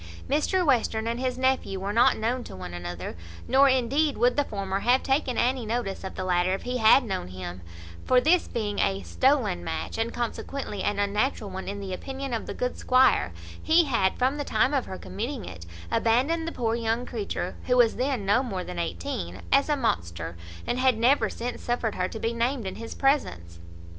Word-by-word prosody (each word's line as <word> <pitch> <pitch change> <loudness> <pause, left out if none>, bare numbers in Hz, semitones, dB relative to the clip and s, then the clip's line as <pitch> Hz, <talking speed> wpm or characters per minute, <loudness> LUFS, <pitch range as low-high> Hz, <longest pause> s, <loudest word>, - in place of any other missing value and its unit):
Mr 345 +6 +1
Western 225 -5 +2
and 235 +1 -2
his 255 -1 -1
nephew 260 -7 0
were 200 +2 -3
not 235 +2 +4
known 240 +3 -1
to - - -10
one 90 -1 -7
another; 90 0 -6 0.3
nor 275 +2 +5
indeed 270 +4 +2
would 245 +1 +3
the 290 - +2
former 195 -5 -3
have 245 +5 +3
taken 270 -2 0
any 250 0 +1
notice 220 -4 -3
of 190 - -6
the 185 - -3
latter 180 0 +2
if - - -8
he 250 0 -2
had 225 +3 +6
known 195 - -3
him; 90 0 -7 0.4
for, 255 - +4
this 330 +6 +3
being 205 -3 -3
a 195 0 +1
stolen 260 -8 +1
match, 160 +6 -4
and 225 +1 0
consequently 240 -2 -4
an 205 +1 0
unnatural 205 +1 0
one 190 0 -6
in 200 +1 -4
the 195 -2 -5
opinion 270 +5 -5
of 230 - -3
the - - -4
good 250 0 -2
squire, 255 - +4 0.3
he 330 +2 +5
had, 230 - +1
from 260 +3 +1
the 290 - -2
time 250 +3 +1
of 270 -3 0
her 190 - -6
committing 225 +5 -5
it, 85 -1 -9 0.2
abandoned 280 +9 +2
the - - -2
poor 230 -6 -1
young 230 +1 -1
creature, 205 -6 -4
who 250 -1 +3
was 235 -2 +4
then 255 -4 -1
no 205 +6 +4
more 195 -8 -4
than 85 - -6
eighteen, 85 +2 -4
as 275 +2 +4
a 295 - +2
monster, 85 - -2 0.3
and 245 - -1
had 255 -3 +3
never 230 -1 +3
since 240 +4 -5
suffered 240 -3 -1
her 180 0 -1
to 220 - -7
be 225 +2 -1
named 235 0 -1
in 190 - -3
his 230 0 -7
presence. 90 - 0
230 Hz, 205 wpm, -26 LUFS, 190-260 Hz, 0.4 s, had